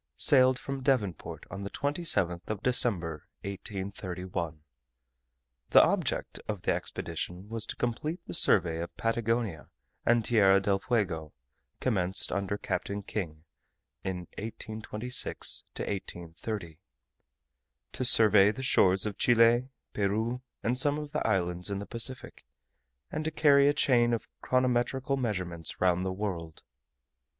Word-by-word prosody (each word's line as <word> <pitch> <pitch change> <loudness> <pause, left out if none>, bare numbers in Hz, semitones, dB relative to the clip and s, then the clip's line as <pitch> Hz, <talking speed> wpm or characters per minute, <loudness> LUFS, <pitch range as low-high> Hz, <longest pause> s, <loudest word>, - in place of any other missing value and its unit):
sailed 130 - +6
from 135 +1 -5
Devonport 125 - -1
on 100 - -6
the 100 - -4
27th 140 - +1
of 110 -1 -4
December, 90 - +1
1831. 95 -4 -5 1.1
The - - +8
object - - -1
of 105 -5 -4
the - - +1
expedition 90 +3 -4
was 115 0 -1
to - - -5
complete 150 +8 -2
the - - -7
survey 85 - +2
of 85 +1 -6
Patagonia 115 -6 -1 0.3
and 120 -2 +2
Tierra 100 -4 +5
del 100 0 +1
Fuego, 95 - -1 0.5
commenced 95 -6 +1
under 100 0 -2
Captain 100 0 -3
King 80 -7 -5 0.6
in 95 -2 -3 0.2
1826 110 +2 0
to - - -3
1830, 85 -2 -6 1.1
to 130 - -3
survey 105 -5 +6
the 130 +5 -7
shores 95 -6 +3
of 105 -2 -4
Chile, 120 +1 +4 0.2
Peru, 110 +5 -1 0.2
and 115 - +1
of 125 - 0
some 145 +2 +1 0.2
islands 90 0 0
in 100 - -2
the 100 - -5
Pacific 120 +3 -2 0.7
and 155 - -3
to 160 - -1
carry 140 -3 +5
a 145 - +4
chain 120 -4 +3
of 115 - -7
chronometrical 130 +1 +1
measurements 95 - -3
round 90 0 +2
the 95 - -1
World. 90 -5 -5
105 Hz, 125 wpm, -29 LUFS, 90-120 Hz, 1.1 s, The